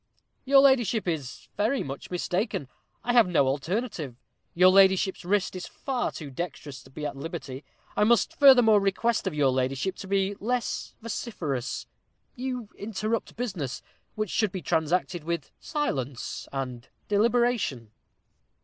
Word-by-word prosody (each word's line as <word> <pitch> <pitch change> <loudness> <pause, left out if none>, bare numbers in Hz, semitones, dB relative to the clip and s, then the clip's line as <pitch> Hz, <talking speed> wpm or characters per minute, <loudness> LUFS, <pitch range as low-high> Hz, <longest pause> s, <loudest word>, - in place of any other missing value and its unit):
"Your 275 0 +7
ladyship 240 -7 +3
is 150 -7 -4
very 225 +6 +1
much 135 0 -7
mistaken 180 - -1 0.4
I 245 - 0
have 235 -5 +6
no 165 -6 +3
alternative 155 - -2 0.4
your 180 +2 +7
ladyship's 190 0 +4
wrist 190 +1 0
is 180 - -5
far 265 -3 -2
too 145 -4 -8
dexterous 145 -3 -6
to 130 - -17
be 150 +3 -6
at 145 - -3
liberty. 140 -2 -6 0.3
I - - +3
must 235 +2 +2
furthermore 245 -7 +8
request 200 +2 0
of 180 - -2
your 140 -3 +3
ladyship 130 +8 -1
to 195 - -8
be 195 0 +1
less 245 +3 -2
vociferous 155 - -3 0.5
you 250 -3 -4
interrupt 215 +2 -3
business, 185 - -4 0.3
which 215 -3 -2
should 215 -4 +1
be 185 -3 -5
transacted 165 +3 0
with 170 +1 -3
silence 140 - -3
and 125 -3 -5 0.2
deliberation." 215 - +1
190 Hz, 140 wpm, -27 LUFS, 145-230 Hz, 0.5 s, furthermore